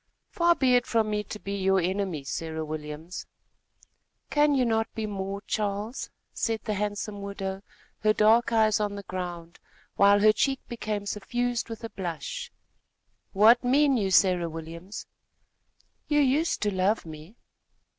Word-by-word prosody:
"Far 345 0 +3
be 260 -4 +3
it 245 -1 +3
from 220 -2 +1
me 210 0 -1
to - - -7
be 200 -1 -5
your 195 -1 +2
enemy, 185 -4 -1
Sarah 160 +3 -4
Williams." 155 +2 -6 1.0
"Can 295 -1 +4
you 255 -2 +3
not 225 -1 0
be 220 - -2
more, 200 -1 -4
Charles?" 210 +3 -3 0.2
said 225 -2 -1
the 215 - -2
handsome 205 0 -3
widow, 195 -1 -5 0.4
her 215 - +3
dark 220 +3 +4
eyes 220 -2 +3
on 205 -1 -1
the 200 - -7
ground, 175 -2 -6 0.4
while 200 0 +6
her 215 0 +6
cheek 270 +3 +1
became 210 -3 -4
suffused 240 +4 -2
with 225 0 -7
a 230 - -4
blush. 485 - -5 0.8
"What 220 +5 +6
mean 275 +2 +4
you, 205 -5 0
Sarah 180 -3 +4
Williams?" 165 +4 -8 1.0
"You 295 -1 +2
used 290 +2 +2
to 205 -1 0
love 190 +3 +1
me." 160 +5 -11
205 Hz, 150 wpm, -27 LUFS, 190-230 Hz, 1.0 s, while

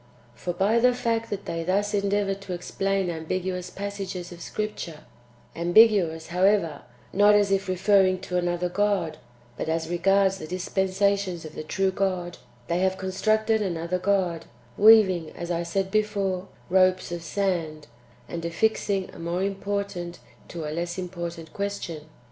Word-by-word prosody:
For 175 +10 -4
by 200 +6 +2
the 250 +1 +4
fact 230 -2 -1
that 200 -1 -4
they 165 0 -3
thus 200 +4 0
endeavour 200 0 +1
to 195 -1 -7
explain 195 +1 -1
ambiguous 180 +2 -3
passages 195 -3 -5
of 175 -1 -10
Scripture 190 -8 -5 0.5
(ambiguous, 175 -3 +4
however, 180 -2 +2 0.3
not 205 +1 +6
as 205 -1 +3
if 195 0 +1
referring 185 0 +3
to 180 -1 -5
another 175 0 0
God, 195 -3 0 0.4
but - - -3
as 165 0 -1
regards 195 +2 +3
the 155 - -7
dispensations 190 0 0
of 155 - -9
[the - - -5
true] 190 +5 0
God), 185 -2 -2 0.3
they 170 - 0
have 190 0 +1
constructed 215 +4 +1
another 175 -2 -2
God, 185 -3 0 0.3
weaving, 200 -7 +6
as 175 0 -5
I 170 0 0
said 190 +3 -2
before, 200 -3 0 0.2
ropes 185 -1 +3
of 175 -1 -4
sand, 165 -5 -2 0.4
and 170 -1 -5
affixing 195 +2 0
a - - -11
more 170 +2 -2
important 195 -3 -3 0.3
to 165 -3 -6
a 150 - -4
less 175 +2 -3
important 170 -3 -6
question. 200 -6 -4
185 Hz, 150 wpm, -26 LUFS, 175-200 Hz, 0.5 s, not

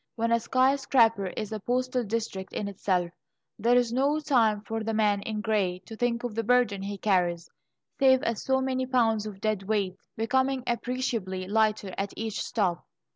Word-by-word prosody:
When 230 0 0
a 235 - +4
skyscraper 255 -4 +3
is 210 +3 -5
a 215 - -3
postal 250 +3 -1
district 210 -3 -4
in 205 - -3
itself, 185 -3 -1 0.5
there 235 +4 +3
is 245 -2 +2
no 280 +4 +2
time 235 -9 +2
for 225 +1 -4
the 220 0 -2
man 210 -2 +2
in 215 +1 -4
grey 205 -5 0
to 225 - -9
think 235 +1 -1
of 240 -3 -3
the 230 - -1
burden 230 -3 +2
he 200 +1 -4
carries, 175 -4 0 0.5
save 260 -1 +5
as 230 -2 -1
so 265 0 +1
many 260 -1 -1
pounds 225 -4 +2
of 200 -2 -8
dead 215 -1 -1
weight, 195 -2 -1 0.2
becoming 260 +3 +1
appreciably 235 -6 -2
lighter 215 -2 +1
at 195 0 -3
each 220 -1 -3
stop. 185 -7 -1
225 Hz, 180 wpm, -27 LUFS, 200-245 Hz, 0.5 s, save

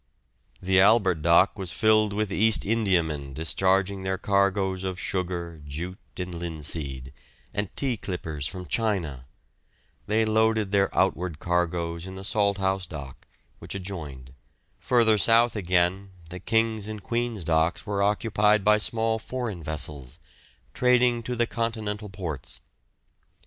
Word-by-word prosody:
The 95 0 +2
Albert 95 -5 +4
dock 85 +5 +4
was 95 -3 -3
filled 110 +3 +3
with 105 0 -2
East 110 +3 +4
Indiamen 85 -10 0
discharging 95 +5 +1
their 95 0 -2
cargoes 100 -1 +1
of 95 -1 -3
sugar, 85 -4 -3
jute, 85 +6 -6 0.2
and 90 -1 -4
linseed, 75 -5 -5 0.4
and 100 -1 -2
tea 130 -4 0
clippers 80 -8 -4
from 90 +1 -7
China; 85 - -2 0.8
they 110 +2 +2
loaded 110 -2 +2
their 100 -1 +3
outward 85 -2 +1
cargoes 85 0 -1
in 95 - -8
the 95 - -8
Salthouse 95 -2 0
dock, 70 -5 -9 0.3
which - - -7
adjoined; 75 -10 -7 0.5
further 115 -3 +3
south 115 +3 +5
again, 95 0 +1 0.2
the 90 - -6
King's 110 -1 0
and 105 -2 -7
Queen's 115 -3 -2
docks 80 +1 +1
were 100 -1 -1
occupied 105 0 +2
by 105 +1 +4
small 110 +1 0
foreign 115 -5 -5
vessels, 75 -4 -4 0.6
trading 125 -1 +3
to 125 +2 -4
the 120 0 +2
continental 110 -3 -3
ports. 90 -7 -6
95 Hz, 130 wpm, -26 LUFS, 85-110 Hz, 0.8 s, south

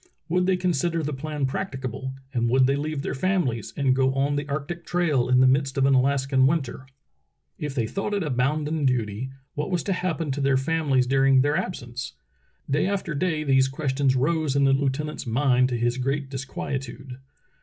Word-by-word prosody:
Would 180 +2 +1
they 190 -1 +3
consider 170 -2 0
the 150 +1 -2
plan 150 +1 -3
practicable, 130 - -4 0.2
and 120 -2 +1
would 130 +2 +4
they 135 +1 +2
leave 145 0 -3
their - - -2
families 135 - -1
and 135 -3 +2
go 130 0 +2
on 140 +1 +1
the 145 0 -3
arctic 155 +5 -4
trail 160 -10 +1
in 125 0 +5
the 130 - +6
midst 135 0 +1
of 135 - +3
an 135 - +4
Alaskan 135 0 +3
winter? 135 -4 -2 0.7
If 150 -2 -4
they 120 -5 +1
thought 195 - -3
it 200 - 0
a 150 - -2
bounden 150 +4 0
duty, 120 -1 -1 0.2
what 150 - -3
was 180 -4 -1
to 195 - 0
happen 165 -5 -2
to 140 +2 -2
their 135 -1 +3
families 140 -2 +1
during 135 0 +4
their 145 +2 +1
absence? 130 -9 -4 0.5
Day 150 +6 +1
after 195 -5 -2
day 155 +1 0
these 135 -2 +3
questions 135 -1 0
rose 150 +1 +1
in 140 - +3
the 135 0 +4
lieutenant's 140 +1 -1
mind 125 +1 +3
to 120 - -1
his 120 +2 0
great 135 +1 -2
disquietude. 135 -1 -5
135 Hz, 190 wpm, -25 LUFS, 130-155 Hz, 0.7 s, the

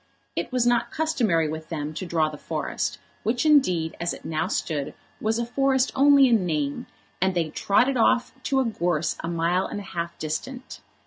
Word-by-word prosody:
It - - -3
was 250 -1 +1
not 240 -1 +2
customary 235 - +1
with 155 +1 -6
them 150 -2 -4
to 180 +3 -5
draw 160 -2 +2
the 155 - -6
forest, - - -3 0.2
which 240 +7 0
indeed, 185 - +3
as 170 +1 -1
it - - -15
now 160 +1 -1
stood, 155 -7 -2 0.2
was 220 +1 0
a 235 - -1
forest 265 +1 +1
only 280 0 +6
in 230 -5 +3
name, 150 -5 -2 0.3
and 190 0 +2
they 165 -3 0
trotted 245 - +2
off 245 +2 +3
to 270 - +2
a 265 - +2
gorse 175 -8 0
a - - -3
mile 170 +2 +1
and - - -5
a - - -7
half 170 -3 -5
distant. 245 - -5
185 Hz, 190 wpm, -25 LUFS, 160-250 Hz, 0.3 s, only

